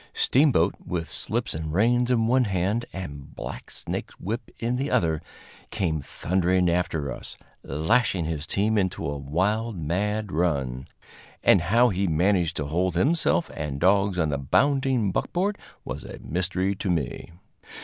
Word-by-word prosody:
Steamboat, 130 - +4
with 85 -2 -3
slips - - -2
and 80 0 -4
reins 120 +7 +3
in 115 -3 +3
one 125 +2 +3
hand 100 +4 0
and 70 -7 -8
blacksnake - - -5
whip 115 +5 -5
in 120 +2 -1
the 140 +3 -1
other, 80 -3 +1 0.5
came 85 -8 -1
thundering 90 +3 +1
after 80 -5 -1
us, - - -8 0.3
lashing 85 - +1
his 80 -1 -3
team 105 +2 +1
into 95 -1 -1
a 70 - -2
wild, 100 +10 0
mad 100 +6 -1
run 70 -7 -1 0.6
and - - +6
how 120 +7 +4
he 95 -1 0
managed 85 0 +2
to 75 - -1
hold 90 +4 0
himself 165 - +2
and 75 -2 -4
dogs 100 +1 +3
on 80 -3 +1
the 70 -1 -1
bounding 130 - +2
buckboard 195 - 0 0.3
was - - -5
a - - -8
mystery 95 +3 -1
to 95 0 -4
me. 80 -4 -2
95 Hz, 150 wpm, -25 LUFS, 80-110 Hz, 0.6 s, and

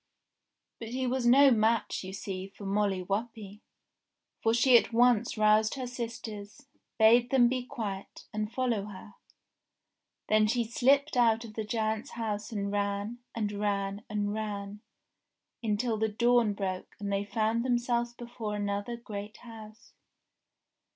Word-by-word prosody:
But 230 - -6
he 255 +3 -2
was 250 -1 0
no 275 +3 +7
match 225 -2 +1
you 185 - -6
see 190 -1 -5
for 200 +1 -12
Molly 195 -1 0
Whuppie; 210 +1 -4 0.8
for 225 - +3
she 240 +2 +5
at 235 - +5
once 240 -1 +3
roused 215 +1 +4
her 260 -2 -4
sisters, 230 0 -7 0.3
bade 235 +2 +5
them 250 -2 +5
be 255 0 -1
quiet, 200 -6 -6
and 215 0 -2
follow 235 -5 -1
her. 205 0 -11 1.1
Then 215 0 +4
she 235 +2 +1
slipped 270 +5 +2
out 230 -1 +3
of 215 - -10
the 220 - -3
giant's 220 +3 -2
house 215 -1 -4
and 200 -2 -2
ran, 205 +3 -2 0.2
and 210 -3 -1
ran, 200 0 -2
and 205 -1 -1
ran 205 -1 -5 0.8
until 225 +1 0
the 220 0 +1
dawn 235 0 +3
broke 190 -2 -4
and 200 -1 -3
they 200 0 0
found 220 +3 0
them 245 -1 +2
selves 240 0 -1
before 235 -3 -5
another 205 +3 -3
great 210 -2 -7
house. 225 -2 -13
220 Hz, 145 wpm, -29 LUFS, 205-240 Hz, 1.1 s, no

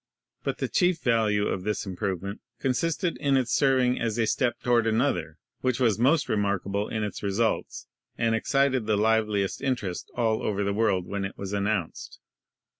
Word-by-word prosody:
But - - -2
the - - -2
chief 180 -3 +2
value 110 -4 +2
of 95 - -2
this 105 +3 -2
improvement 95 +1 -4 0.2
consisted 165 +7 0
in 140 -2 +2
its 130 -2 0
serving 130 -3 +3
as 115 -1 -1
a 115 - +2
step 120 +2 0
toward 120 -2 +3
another, 110 - 0 0.2
which 130 -1 0
was 115 -5 +2
most 140 +6 +3
remarkable 100 0 -1
in 110 -1 -2
its 105 - -4
re 100 - -1
sults 110 +3 -1 0.3
and 115 -1 +1
excited 130 +1 +1
the 110 -1 +2
liveliest 105 -2 +1
interest 120 -10 -2
all 110 -2 +1
over 100 -1 -1
the 100 0 0
world 100 -4 +1
when 100 +1 -3
it 95 - -5
was 100 0 -5
announced. 100 -3 -2
110 Hz, 175 wpm, -27 LUFS, 100-125 Hz, 0.3 s, serving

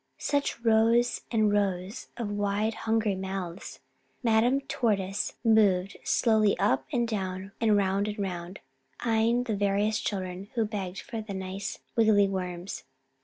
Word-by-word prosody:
Such 285 -4 -1
rows 230 +1 +3
and 215 -3 +2
rows 195 -1 -1
of 225 -4 -3
wide 205 +2 0 0.2
hungry 220 -2 +2
mouths! 190 -1 -5 0.4
Madame 240 +4 +3
Tortoise 205 -7 -1
moved 205 -4 +3
slowly 215 -3 +3
up 130 - +1
and 240 -1 +1
down 190 -3 -3
and 215 -2 +4
round 200 +1 +1
and 210 +1 -4
round, 185 -2 -4 0.4
eyeing 230 +1 +2
the 225 -4 -2
various 205 +2 +1
children 190 -1 -4
who 225 -2 +2
begged 195 -3 -4
for 230 -5 -5
the 210 -2 -6
nice 190 +1 -4 0.2
wiggly 215 -3 +5
worms. 180 -1 -4
205 Hz, 135 wpm, -28 LUFS, 190-225 Hz, 0.4 s, wiggly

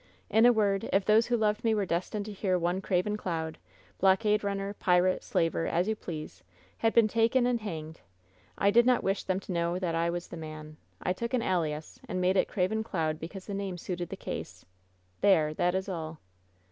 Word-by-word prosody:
In 220 +3 +6
a - - +8
word 200 -4 +1
— - - -6
if 195 0 +2
those 220 +2 +4
who 240 0 +2
loved 210 +1 +1
me 225 -1 +3
were 205 -2 0
destined 185 +4 -2
to 215 - -6
hear 190 -2 0
one 175 +2 0
Craven 190 +3 0
Cloud 160 -5 -4 0.2
— - - -30
blockade 210 +2 +3
runner, 200 0 -2
pirate, 180 -1 +2
slaver, 165 0 0
as 175 +3 +1
you 220 - +1
please 155 - -7 0.2
— 95 +2 -31
had 225 - +3
been 230 -1 +5
taken 230 +3 +2
and 245 -2 +1
hanged, 160 -6 -6 0.6
I 200 - +3
did 235 +3 +5
not 250 -1 +3
wish 195 +1 0
them 185 0 0
to 190 - -8
know 170 0 0
that 180 -3 -2
I 165 +1 +1
was 175 0 -4
the 175 - -7
man. 155 -1 -8 0.3
I 180 - +1
took 235 +6 -2
an 235 - 0
alias, 160 -4 -2
and 185 - -2
I - - 0
made 185 +1 +2
it 185 - +3
Craven 215 +3 0
Cloud 160 -7 -2
because 185 +4 -8
the 205 - -5
name 195 -2 -3
suited 175 0 -4
the - - -6
case. - - -6 0.6
There! 160 -6 +4
that 175 +3 +1
is 190 +1 -1
all." 160 -4 -5
190 Hz, 225 wpm, -29 LUFS, 170-210 Hz, 0.6 s, a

